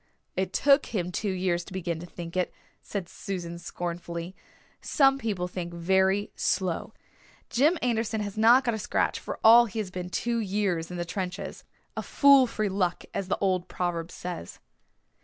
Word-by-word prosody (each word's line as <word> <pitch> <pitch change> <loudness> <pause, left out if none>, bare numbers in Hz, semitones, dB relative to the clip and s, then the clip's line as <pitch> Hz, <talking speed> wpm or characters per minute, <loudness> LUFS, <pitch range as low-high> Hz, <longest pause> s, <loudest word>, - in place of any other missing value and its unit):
"It 190 0 -1
took 280 +1 +4
him 180 -5 -2
two 205 +3 -2
years 180 -2 0
to 190 - -12
begin 175 -3 -3
to 175 - -8
think 170 0 -8
it," 180 -1 0 0.3
said 195 -4 -5
Susan 175 -3 -6
scornfully. 175 +1 -5 0.5
"Some 270 -1 +3
people 200 -7 -2
think 175 -1 -6
very 190 +3 +2
slow. 185 -4 -1 0.6
Jim 300 +8 +3
Anderson 225 -2 0
has 205 -1 -4
not 235 +4 +6
got 240 -2 0
a 220 - -3
scratch, - - 0
for - - -6
all 235 +2 +8
he 215 - -8
has 205 -4 -2
been 180 -1 -5
two 235 +6 -1
years 195 -5 -1
in 180 - -6
the 175 - -2
trenches. 180 +1 -5 0.3
A - - -2
fool 280 -2 +6
for 215 -2 -1
luck, 185 -3 -1
as 195 - -2
the - - 0
old 185 -2 0
proverb 170 -2 -2
says." 175 - -7
190 Hz, 175 wpm, -27 LUFS, 175-220 Hz, 0.6 s, all